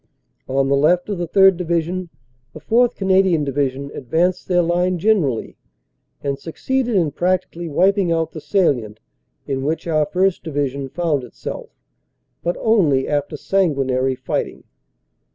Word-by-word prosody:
On 135 +1 +1
the 140 - +3
left 175 +7 +2
of 200 -4 -3
the 175 - -2
3rd. 190 +1 +5
Division, 170 +1 -2 0.4
the - - -9
4th. 240 +1 +2
Canadian 190 -4 +2
Divi 140 -1 0
sion 140 +2 -8
advanced 165 +8 -1
their 175 -1 +3
line 175 +2 +1
generally 170 - 0 0.7
and 140 -1 -2
succeeded 245 - -2
in 165 -6 +2
practically 175 0 -1
wiping 190 +3 +2
out 165 -1 0
the 155 - -8
salient 125 - 0 0.5
in 135 -1 -2
which 155 +3 -2
our 155 -3 +1
1st. 185 +3 +1
Division 140 -3 -3
found 155 -3 -1
itself, 125 - -7 0.7
but 175 +1 -2
only 165 -12 +2
after 145 +1 -2
sanguinary 135 -8 0
fighting. - - -4
165 Hz, 140 wpm, -20 LUFS, 140-185 Hz, 0.7 s, 3rd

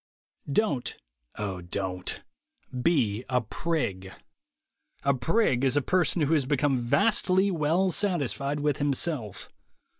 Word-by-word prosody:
Don't, 140 - 0 0.4
(O 100 -4 -4
Don't) 90 +1 -4 0.6
be 125 -9 +1
a 125 -1 +2
prig. 105 - -3 0.9
A 140 - +3
prig 135 - +1
is 135 +1 +3
a - - +3
person 175 -1 +1
who 145 +3 +2
has 140 -5 +1
become 140 -2 +1
vastly 185 - +2
well 170 +3 +1
satisfied 150 - 0
with 145 -2 +1
himself. 135 - -1
140 Hz, 115 wpm, -27 LUFS, 120-165 Hz, 0.9 s, A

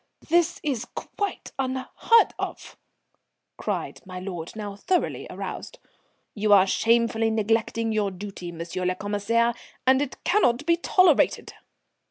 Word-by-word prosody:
"This 345 +1 +3
is 260 -6 -1
quite 405 -1 -4
unheard 265 - +2
of," - - -5 0.8
cried - - -4
my 185 -2 -8
lord, 180 -2 -6
now 205 -2 -5
thoroughly 360 - -1
aroused. - - -6 0.6
"You 210 0 0
are 190 -2 +7
shamefully 230 +2 +2
neglecting 225 +1 0
your 210 -2 +1
duty, 190 -2 -7
M. 170 - -9
le 180 +2 -2
Commissaire, 210 +4 +1 0.3
and 260 +1 +5
it 285 -2 -3
cannot 295 - +2
be 335 +1 +4
tolerated." 350 -1 +3
225 Hz, 125 wpm, -25 LUFS, 200-270 Hz, 0.8 s, are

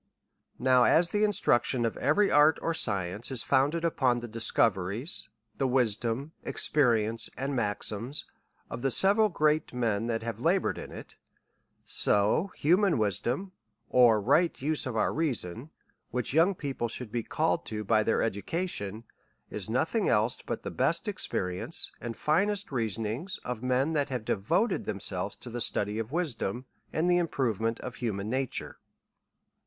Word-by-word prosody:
Now 125 -1 +4
as 170 +9 +4
the 210 +2 +1
instruction 130 - +2
of 115 - -1
every 155 +10 +2
art 150 +1 +5
or 165 - -1
science 100 - -2
is 130 -4 +1
founded 145 +5 +2
upon 130 -7 +2
the 120 0 -5
discoveries^ 110 - 0 0.3
the 135 - +2
wisdom, 125 +2 0
experience, 115 -6 +2
and 135 +1 -2
maxims 110 +3 -2 0.4
of 115 - -7
the 135 - +1
several 200 - +4
g - - -18
reat 155 -2 +2
men 115 -3 0
that 115 -1 -2
have 115 -2 -4
labour 175 +8 +2
ed - - -8
in - - -8
it; - - -10 0.7
so 105 - +2
that - - -20
human 180 +4 +4
wisdom, 120 - -1 0.4
or 120 -4 +6
right 155 - +2
use 150 +1 0
of 120 -3 -3
our - - +1
reason, 130 - -2 0.4
which 125 +1 -3
young 170 +5 +4
people 135 -6 -3
should 115 -1 -8
be 120 0 -1
called 90 -5 0
to 105 -1 -4
by 110 +1 +3
their 110 - +1
education, 110 - -3 0.5
is - - -5
nothing - - +1
else - - +1
but - - -5
the - - -4
best - - 0
experience 90 - -2
and 115 -2 -5
finest 200 +6 +1
reasonings 115 - -2
of 125 -3 -4
men, 130 +5 +1
that 145 -2 0
have 125 -4 -4
devoted 145 - 0
them 100 - -3
selves 100 0 -4
to 120 - -10
the 120 +1 -4
study 105 0 0
of 115 +2 -4
wisdom, 130 - -2 0.3
and 160 +3 0
the 175 0 +4
improvement 115 - -1
of 125 -3 -7
human 105 -3 -3
nature. 130 -1 -3
125 Hz, 160 wpm, -29 LUFS, 110-155 Hz, 0.7 s, or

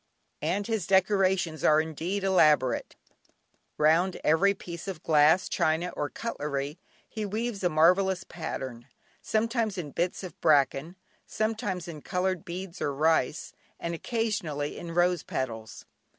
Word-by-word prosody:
And 180 +7 -1
his 220 -5 -2
decorations 190 -4 +2
are 155 0 +5
indeed 165 +5 -2
elaborate; 155 -9 +3 0.8
round 165 +5 +3
every 195 +6 +4
piece 170 0 -8
of 180 -4 -6
glass, 155 +3 +4
china, 160 +3 +1
or 145 - -2
cutlery 150 -8 -4 0.3
he 215 - -5
weaves 215 0 -3
a 180 - +3
marvellous 180 +4 +3
pattern, 130 -8 -6 0.3
sometimes 225 -2 0
in 155 -5 -5
bits 175 +5 -2
of 180 -4 -9
bracken, 145 +3 +3 0.3
sometimes 215 -5 -2
in 155 -3 -8
coloured 185 0 -1
beads 185 -1 -7
or 140 - -1
rice, 155 -1 +1 0.3
and 170 - -3
occasionally 170 - -2
in 170 -1 -7
rose 175 -1 +3
petals. 115 -4 -5
175 Hz, 130 wpm, -28 LUFS, 155-195 Hz, 0.8 s, are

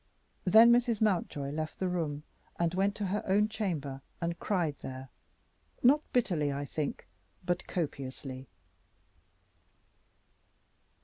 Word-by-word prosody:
Then 220 +5 +8
Mrs. 240 -2 +3
Mountjoy 170 -9 0
left 155 +1 -4
the 185 - -1
room 155 -5 -2 0.3
and 170 0 +1
went 195 +2 +1
to 205 - -2
her 200 +3 -1
own 205 +2 +4
chamber 155 -11 -3 0.2
and 170 0 -2
cried 175 -8 0
there, 130 0 -7 0.7
not 280 +5 +6
bitterly, 170 - +1
I 140 +1 -3
think, 145 0 -4 0.4
but 175 0 -1
copiously. 135 -5 -4
170 Hz, 115 wpm, -31 LUFS, 145-205 Hz, 0.7 s, Then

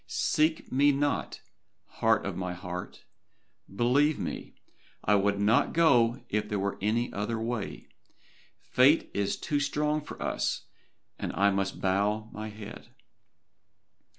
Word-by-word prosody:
Seek 155 +1 0
me 140 +3 +4
not, 145 +1 -1 0.4
heart - - +1
of - - -3
my 90 -1 -3
heart. 90 0 -7 0.7
Believe 140 +7 +3
me, - - -5 0.5
I 105 - +4
would 100 0 +2
not 105 +3 +3
go 130 -7 +3
if 105 0 -2
there 105 - -1
were 100 0 -2
any 115 +4 0
other 110 +3 -2
way. 115 -2 -4 0.8
Fate 135 +5 +4
is 100 -1 -1
too 145 - -1
strong 150 +2 0
for - - -10
us, - - -1 0.6
and - - -3
I 100 +1 +3
must 95 0 -2
bow 105 +3 0
my 110 0 -5
head. 105 -1 -10
110 Hz, 130 wpm, -29 LUFS, 100-140 Hz, 0.8 s, me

